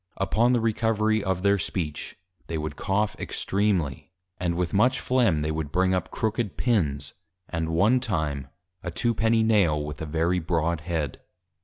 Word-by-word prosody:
Upon 110 +5 +2
the 125 - +3
Recovery 110 -1 +1
of 95 -1 -1
their 100 0 +3
Speech, 80 -3 -4 0.3
they 80 - -3
would 75 -1 -4
Cough 105 +5 0
extreamly; 95 -8 -1 0.3
and 85 -2 0
with 90 -1 -1
much 125 +6 +3
Flegm, 115 -12 +2
they 75 - -1
would 80 -2 -3
bring 95 +2 +2
up 90 -2 -1
Crooked 110 -1 -2
Pins; 75 - 0 0.3
and 80 -2 -2
one 100 +10 +3
time, 80 - -2 0.3
a 90 - -4
Two 115 +8 0
penny 110 0 +2
Nail, 100 -9 +3
with 75 -1 -6
a 80 - -4
very 85 +4 +1
broad 85 -1 0
Head. 80 -4 -3
90 Hz, 165 wpm, -26 LUFS, 80-110 Hz, 0.3 s, the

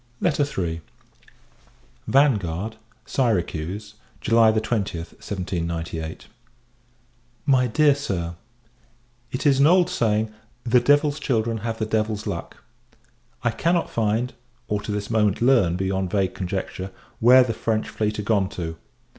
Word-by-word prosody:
III. 95 - 0 1.3
Vanguard, 110 - +2 0.3
Syracuse, 105 - -1 0.3
July 115 -1 +4
20th, 105 -6 -2
1798. 85 -4 -4 1.2
MY 130 -3 +4
DEAR 145 +5 +4
SIR, 95 -12 -3 1.0
It 130 - -4
is 140 -2 +4
an 140 - +6
old 180 +1 +4
saying, 110 -7 0 0.3
"The 125 +1 +4
devil's 145 +3 +3
children 115 -5 0
have 115 +1 -3
the 110 - -1
devil's 110 -1 -1
luck." - - -6 0.8
I 120 - +2
cannot 170 +8 0
find 115 +2 0 0.3
or, 105 0 -1
to 105 - -5
this 105 +1 -3
moment 105 -3 +2
learn, 120 -9 +4
beyond 95 0 -1
vague 95 -2 0
conjecture 95 0 -4 0.3
where 125 +3 +7
the 120 -2 -2
French 110 0 -1
fleet 105 0 -2
are 105 - -3
gone 100 -2 +1
to. 80 -4 -5
110 Hz, 120 wpm, -23 LUFS, 95-125 Hz, 1.3 s, where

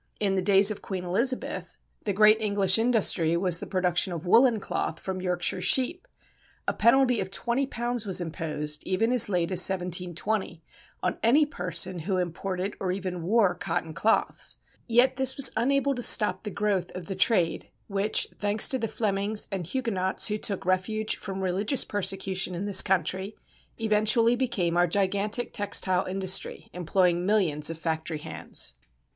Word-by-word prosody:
In 200 -2 0
the 190 - 0
days 195 +2 +5
of 210 - -7
Queen 185 -2 -6
Elizabeth 235 +9 -1 0.3
the 205 - 0
great 215 +2 +4
English 200 -2 +3
industry 205 -8 +1
was 175 -2 +3
the - - -7
production 180 -1 0
of 170 0 -6
woollen 230 +4 +4
cloth 165 -4 -4
from 190 -1 -5
Yorkshire 180 -1 -2
sheep. 330 +8 +2 0.6
A - - 0
penalty 250 +1 +3
of 190 -1 -4
£20 240 0 -3
was 190 - +4
imposed, 150 -3 -3
even 205 +5 0
as 245 -4 +6
late 175 -2 -1
as 185 - +3
1720, 180 0 -1 0.4
on - - -2
any 275 +7 +3
person 180 - -1
who 185 +4 -3
imported 185 +2 -4
or 185 -2 -2
even 185 -2 -5
wore 200 +1 +2
cotton 160 -2 -4
cloths. 225 +7 -1 0.3
Yet 250 +2 +2
this 265 -1 +2
was 275 - +6
unable 275 +4 +1
to 250 - -6
stop 220 -2 +3
the - - -3
growth 200 -3 -2
of 180 -2 -7
the 195 - -5
trade 185 -4 0 0.2
which, 200 +1 0
thanks 205 +1 +3
to 260 - -1
the 225 - -2
Flemings 205 0 -1
and 185 -4 -5
Huguenots 195 -6 0
who 210 0 -2
took 200 -3 -4
refuge 200 +4 -1
from 195 -2 -7
religious 195 +7 +1
persecution 195 -2 -1
in 185 +4 -4
this 200 -2 +8
country, 190 +1 -2 0.4
eventually 225 +2 +2
became 205 -10 -2
our 175 0 +3
gigantic 200 +5 -1
textile 200 -3 0
industry 190 0 -1
employing 180 0 0
millions 180 -8 +1
of 165 - -6
factory 160 -1 -4
hands. 150 - -4
195 Hz, 160 wpm, -26 LUFS, 180-220 Hz, 0.6 s, this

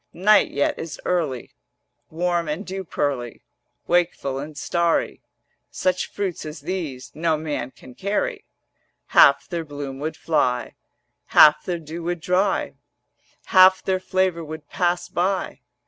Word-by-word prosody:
Night 205 +4 +4
yet 140 - -1
is 165 -2 -6
early, 155 -9 -2 0.6
Warm 175 0 -1
and 155 +7 -3
dew 190 +1 -5
pearly, 135 -8 -3 0.4
Wakeful 170 -6 0
and 145 +1 -8
starry: 170 +2 0 0.5
Such 185 0 -1
fruits 195 -4 -4
as 155 +1 -8
these 155 -9 -5
No 160 0 0
man 150 -5 -4
can 130 -1 -15
carry; 395 - -2 0.7
Half 140 0 +6
their 170 -3 -3
bloom 145 -3 -7
would 155 +2 -4
fly, 125 -7 0 0.6
Half 150 0 +8
their 175 -2 -2
dew 165 +1 -8
would 175 +1 -3
dry, 185 +4 0 0.7
Half 185 0 +6
their 190 -1 0
flavour 185 -2 0
would 155 -1 -8
pass 175 -1 0
by. 185 -2 -1
170 Hz, 130 wpm, -23 LUFS, 150-185 Hz, 0.7 s, Half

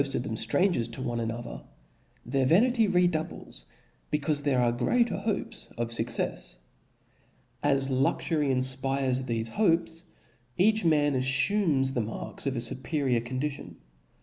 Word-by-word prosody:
139 140 -1 -2
of - - -2 0.5
them 120 - 0
ftrangers 115 - -7
to 120 - -8
one 120 -2 -2
another, 115 +1 -5 0.6
their 130 +1 0
vanity 225 - +4
re 180 -2 +3
Book 175 - +3
doubles, 155 - -5 0.4
becaufe 150 0 0
there 140 -3 +1
are 120 -1 +3
greater 230 - +1
hopes 200 +1 -3
of 120 0 -2
fuccefs. 115 - -1
rw'.^ - - -29 1.0
As 135 -1 +2
luxury 145 +3 +1
infpires 130 0 +1
thefe 115 -2 -2
hopes, 165 - 0 0.5
e^ch 215 +3 +3
man 150 -3 +3
aflumes 135 +2 +2
the 120 - 0
marks 110 +5 -6
of 135 - -1
a - - -1
fuperior 130 0 0
condition. 130 +4 -4
135 Hz, 145 wpm, -28 LUFS, 125-165 Hz, 1.0 s, vanity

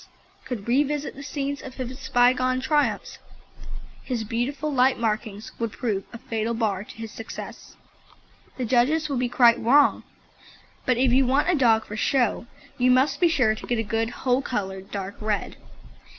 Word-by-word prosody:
could 245 -6 -5
revisit 290 +3 +1
the 275 - -10
scenes 285 0 -4
of 260 -1 -9
his 260 +1 -6
bygone 255 +1 +3
triumphs, 295 +3 0 0.8
his 245 -4 -3
beautiful 270 +7 -2
light 260 0 +3
markings 220 -1 -3
would 230 -2 -2
prove 205 -5 -2
a 235 - -8
fatal 225 0 -3
bar 205 -4 -1
to - - -13
his 225 -1 -7
success. 225 - -9 0.8
The 255 - -2
judges 265 +7 +2
would 275 -3 -1
be 250 -1 0
quite 240 -1 +5
wrong, 275 +5 +4 0.9
but 255 -2 +3
if 250 -1 +3
you 260 0 +4
want 285 +7 +2
a - - +2
dog 225 -6 +3
for 210 - -7
show 240 0 +1 0.3
you 250 +1 +4
must 270 +3 +3
be 350 - +5
sure 260 -9 +3
to 215 - -9
get 240 - 0
a 225 - 0
good 225 +2 -1
whole 250 +1 0
coloured 195 -7 -4
dark 200 0 -5
red. 215 -1 -2
245 Hz, 170 wpm, -25 LUFS, 225-270 Hz, 0.9 s, quite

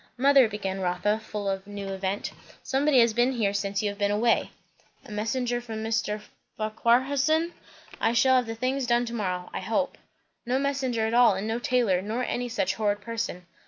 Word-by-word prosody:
"Mother," 270 -2 +5
began 195 -2 -4
Rotha, 185 +4 0
full 210 -2 -5
of 195 -1 -1
the - - -15
new 200 -1 -6
event, 195 +1 -3 0.3
"somebody 270 -1 +3
has 230 -1 +3
been 240 +3 +2
here 210 -5 0
since 200 +1 -1
you 210 - +1
have 200 0 -8
been 200 0 +2
away." 220 +3 +2 0.6
"A - - -12
messenger 240 +3 -1
from 220 -2 -6
Mr. 220 -1 -1 0.4
Farquharson? 270 +9 +2 0.5
I 225 - +2
shall 260 +2 +5
have 250 -2 0
the 225 - -4
things 255 +2 -1
done 240 0 +2
to 235 - -6
morrow, 180 -5 -3
I - - -2
hope." 225 +9 -1 0.4
"No 250 +1 0
messenger 265 -5 0
at 220 - -1
all, 240 -4 +6
and 195 +3 -3
no 225 +2 -1
tailor, 240 -7 +2
nor 220 +6 -2
any 245 0 -2
such 190 -5 0
horrid 205 0 0
person. 225 -5 -4
225 Hz, 195 wpm, -27 LUFS, 205-250 Hz, 0.6 s, all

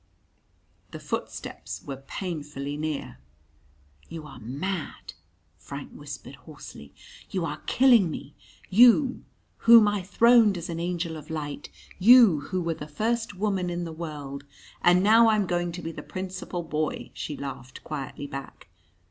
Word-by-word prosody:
The - - -8
footsteps - - -6
were 135 -1 -6
painfully 150 -6 -5
near. 150 - -4 0.9
"You 165 -2 -7
are 135 -4 -11
mad," 135 - -5 0.5
Frank 140 +8 -8
whispered 140 -2 -9
hoarsely. 130 - -12 0.4
"You 185 -3 -2
are 150 -1 -5
killing 240 -8 +5
me 150 - -7 0.4
you 245 +5 +5 0.3
whom 230 -2 +7
I 205 -1 0
throned 225 +1 +5
as 170 0 -6
an 165 -1 -4
angel 170 -1 -3
of 150 0 -12
light; 150 -3 -5 0.3
you 220 -5 +7
who 185 -2 -1
were 165 0 -1
the 150 -1 -8
first 225 +7 -2
woman 190 -2 -1
in 175 0 -3
the 165 -1 -6
world 145 -4 -7 0.2
" - - -23
"And 175 +1 +5
now 225 +2 +6
I'm 215 -2 +2
going 175 -1 -1
to 180 - -7
be 165 - -4
the - - -8
Principal 185 -1 -5
Boy," 155 -1 -3
she 150 - -5
laughed 135 -2 -8
quietly 145 -1 -6
back. 135 -9 -9
170 Hz, 150 wpm, -26 LUFS, 145-195 Hz, 0.9 s, whom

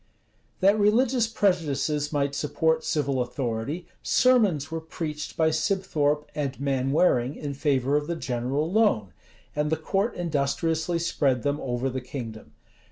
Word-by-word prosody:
That 200 +3 +4
religious 230 +3 +3
prejudices 155 -8 0
might 140 -2 0
support 160 +2 0
civil 140 -4 0
authority, 125 +6 -3 0.2
sermons 215 - +3
were 165 0 -3
preached 155 -1 -5
by 160 -1 +3
Sibthorpe 155 -4 0
and 140 -3 -3
Manwaring, 135 0 +2
in 145 -2 -5
favor 140 -1 +1
of 150 0 -2
the 170 - -2
general 135 +2 -2
loan; 190 - +2 0.4
and 150 0 0
the 160 - +1
court 195 +8 -1
industriously 160 +1 0
spread 140 -7 0
them 145 +1 0
over 125 0 -2
the 130 0 -3
kingdom. 115 - -8
150 Hz, 135 wpm, -26 LUFS, 135-170 Hz, 0.4 s, That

